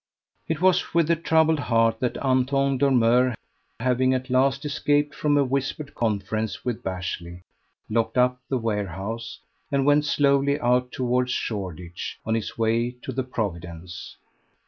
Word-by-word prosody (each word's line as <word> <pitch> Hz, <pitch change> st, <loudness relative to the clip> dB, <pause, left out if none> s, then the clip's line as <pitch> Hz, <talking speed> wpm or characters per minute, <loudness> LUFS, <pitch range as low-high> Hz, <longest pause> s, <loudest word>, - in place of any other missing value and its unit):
It 160 Hz, 0 st, -2 dB
was 185 Hz, -2 st, +2 dB
with 170 Hz, -1 st, +3 dB
a -, -, +4 dB
troubled 160 Hz, -1 st, +2 dB
heart 115 Hz, -4 st, +2 dB
that 125 Hz, -2 st, -1 dB
Anton 135 Hz, +1 st, +2 dB
Dormeur, 125 Hz, -2 st, +3 dB, 0.4 s
having 130 Hz, +2 st, +2 dB
at 130 Hz, 0 st, -4 dB
last 135 Hz, +3 st, +2 dB
escaped 145 Hz, 0 st, +1 dB
from 145 Hz, -1 st, +1 dB
a 140 Hz, -, +4 dB
whispered 140 Hz, +3 st, -2 dB
conference 110 Hz, 0 st, -2 dB
with 120 Hz, -3 st, -2 dB
Bashley, 90 Hz, -1 st, -5 dB, 0.4 s
locked 115 Hz, +3 st, 0 dB
up 125 Hz, 0 st, +3 dB
the 130 Hz, -, +1 dB
warehouse, 105 Hz, 0 st, -4 dB, 0.3 s
and 140 Hz, -1 st, +1 dB
went 145 Hz, +1 st, +4 dB
slowly 140 Hz, 0 st, +2 dB
out 125 Hz, -1 st, +1 dB
towards 125 Hz, 0 st, 0 dB
Shoreditch 90 Hz, -7 st, -4 dB
on 110 Hz, -, 0 dB
his 115 Hz, +1 st, -3 dB
way 115 Hz, +2 st, +1 dB
to -, -, -4 dB
the 130 Hz, +1 st, -1 dB
"Providence." 85 Hz, -7 st, -5 dB
125 Hz, 145 wpm, -25 LUFS, 110-140 Hz, 0.4 s, a